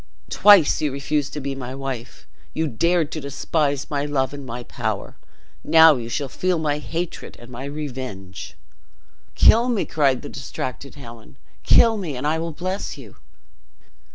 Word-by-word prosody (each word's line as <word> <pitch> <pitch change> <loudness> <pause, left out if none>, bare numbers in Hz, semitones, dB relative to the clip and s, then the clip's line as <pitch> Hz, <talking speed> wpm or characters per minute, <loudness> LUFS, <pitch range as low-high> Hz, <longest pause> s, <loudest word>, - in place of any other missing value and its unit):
Twice 200 -9 +6
you 150 -2 0
refused 140 +1 -1
to 150 - -4
be 140 0 -3
my 130 -1 -6
wife; 135 -3 -6 0.3
you 160 - 0
dared 165 +5 +1
to 155 - -4
despise 140 0 -1
my 140 -1 0
love 140 -2 -1
and 140 -1 -7
my 120 -1 -6
power; - - -4 0.5
now 160 0 +7
you 115 -2 -5
shall 140 +3 -2
feel 180 +6 -1
my 150 -2 -1
hatred 165 +3 -5
and 120 +1 -13
my 125 +3 -7
revenge!" 105 - -7 0.8
"Kill 235 +3 +5
me!" 230 -5 0
cried 140 -4 +1
the - - -6
distracted 130 0 -6
Helen; 120 -3 -12 0.2
"kill 225 -1 +5
me 165 -10 -4
and 130 - -4
I 155 +2 +1
will 165 0 -3
bless 185 +5 -4
you!" - - -13
145 Hz, 160 wpm, -22 LUFS, 130-160 Hz, 0.8 s, now